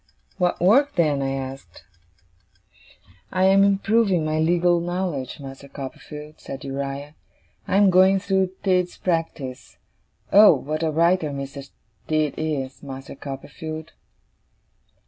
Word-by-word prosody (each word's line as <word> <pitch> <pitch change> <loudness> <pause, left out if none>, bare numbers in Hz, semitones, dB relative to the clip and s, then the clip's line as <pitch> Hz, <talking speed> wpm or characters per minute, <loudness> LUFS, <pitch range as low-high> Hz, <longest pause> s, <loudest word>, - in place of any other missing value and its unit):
'What 180 -1 +1
work, 265 +11 +4
then?' 150 -5 +2
I 135 0 -1
asked. 135 -9 -7 1.5
'I 185 - +1
am 195 +1 +6
improving 200 -3 +2
my 155 0 0
legal 175 +2 +3
knowledge, 175 -7 -3
Master 135 0 -10
Copperfield,' 150 +2 -9
said 135 - -8
Uriah. 140 +1 -5 0.5
'I 190 - +2
am 200 -1 +6
going 190 +2 +5
through 190 -1 +1
Tidd's 180 -2 +1
Practice. 165 -7 -3 0.6
Oh, 205 -4 +8
what 150 +4 -4
a 160 - +1
writer 165 +1 +2
Mr. 140 0 -7 0.4
Tidd 155 -2 +1
is, 140 -4 -3
Master 135 -1 -8
Copperfield! 150 +3 -7
155 Hz, 120 wpm, -23 LUFS, 140-185 Hz, 1.5 s, Oh